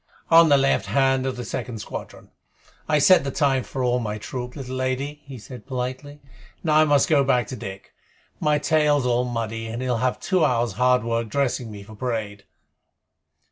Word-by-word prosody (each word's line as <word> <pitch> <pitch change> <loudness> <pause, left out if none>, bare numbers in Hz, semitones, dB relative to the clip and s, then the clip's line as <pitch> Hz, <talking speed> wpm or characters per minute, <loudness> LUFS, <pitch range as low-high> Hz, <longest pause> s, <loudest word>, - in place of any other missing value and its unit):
"On 165 0 +7
the 140 - +6
left 135 0 +1
hand 135 -1 +2
of 130 - -2
the 125 - -5
second 120 -3 -5
squadron. 105 - -8 0.6
I 155 - +4
set 180 +2 +6
the 140 - -2
time 135 -2 +1
for 130 +1 -5
all 125 0 +1
my 105 -3 -3
troop, 125 +3 -6
little 130 -3 -6
lady," 130 +3 -3
he 135 -2 -9
said 125 +3 -11
politely. 130 +2 -5 0.4
"Now 155 -3 +3
I 155 - +6
must 145 -2 +3
go 145 -3 +4
back 125 -3 +2
to 130 - -5
Dick. 95 -3 -9 0.5
My 150 -1 +2
tail's 150 -2 +2
all 125 0 +1
muddy, 115 -2 -4
and 115 +1 -5
he'll 125 -2 -1
have 125 +2 -1
two 185 -4 +1
hours' 120 -5 +1
hard 125 0 +2
work 115 -1 -2
dressing 125 -2 -1
me 105 -2 -9
for 110 +2 -13
parade." 105 -3 -4
130 Hz, 190 wpm, -23 LUFS, 120-140 Hz, 0.6 s, On